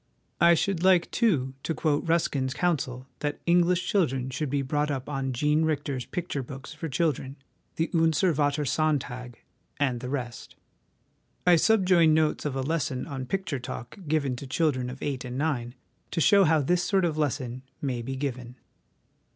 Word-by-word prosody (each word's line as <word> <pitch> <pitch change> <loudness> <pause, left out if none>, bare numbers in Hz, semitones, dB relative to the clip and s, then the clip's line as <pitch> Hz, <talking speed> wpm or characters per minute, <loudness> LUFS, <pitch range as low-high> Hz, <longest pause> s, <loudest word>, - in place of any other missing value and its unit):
I 170 +1 +6
should 175 +1 0
like, 185 -2 +4
too, 150 - +1
to 165 - -2
quote 155 +1 0
Ruskin's 140 -6 +1
counsel 130 -8 -1
that 145 0 -2
English 175 +1 +3
children 135 -9 +1
should 145 +3 -2
be 140 0 0
brought 150 +2 0
up 135 -3 -3
on 135 -2 -2
Jean 150 +5 +2
Richter's 145 -5 -1
picture 175 -5 -3
books 135 +3 -9
for 160 +1 -5
children, 135 -2 -1 0.4
the 165 - -1
Unser 165 +1 +3
Vater, 145 0 +1
Sontag^ 125 -4 -1 0.4
and 130 -4 +1
the 125 +1 -6
rest. 125 -4 -5 0.9
I 180 -1 +7
subjoin 180 -5 +4
notes 155 -1 +1
of 145 -3 -2
a 135 - -1
lesson 140 -3 -1
on 135 -2 -5
a - - -4
Picture 170 -3 -2
talk 120 -1 -7
2 200 - -14
given 145 -4 +1
to 135 - -8
children 130 -4 0
of 130 +1 -8
eight 135 -3 -2
and 125 0 -5
nine, 130 -5 -1 0.3
to 165 - -2
show 200 +4 +6
how 160 -1 +4
this 175 +6 +2
sort 190 0 +2
of 160 -3 0
lesson 130 -4 -2 0.2
may 130 -4 -2
be 135 +3 -4
given. 125 -3 -4
145 Hz, 175 wpm, -27 LUFS, 130-165 Hz, 0.9 s, I